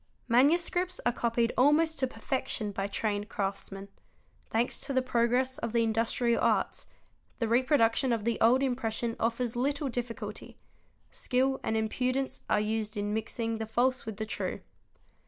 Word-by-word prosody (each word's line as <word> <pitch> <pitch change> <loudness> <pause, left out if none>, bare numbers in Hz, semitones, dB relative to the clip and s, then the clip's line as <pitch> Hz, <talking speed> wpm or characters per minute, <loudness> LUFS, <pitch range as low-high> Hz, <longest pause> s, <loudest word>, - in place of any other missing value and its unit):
Manuscripts 340 +8 +3
are 240 - +4
copied 235 0 0
almost 310 +5 +3
to 260 - +2
perfection 225 -2 -3
by 195 0 -2
trained 205 0 -2
craftsmen; 195 -1 -4 0.6
thanks 230 +2 0
to 275 - -3
the 260 - +3
progress 250 +1 +1
of 230 - -3
the 235 -1 +3
industrial 230 +1 +1
arts, - - +1 0.5
the 230 - -1
reproduction 245 0 +3
of 230 -3 0
the 235 +1 -1
old 250 +4 +5
impression 235 -3 -1
offers 235 +1 -1
little 280 +3 0
difficulty: 240 -1 -5 0.5
skill 265 +1 +1
and 220 - 0
impudence 255 +4 -1
are - - +3
used 215 0 -2
in 205 0 -1
mixing 225 +1 -2
the 220 - -3
false 250 +3 +1
with 220 -2 -5
the 215 - -3
true. 220 - -3
235 Hz, 150 wpm, -30 LUFS, 220-260 Hz, 0.6 s, old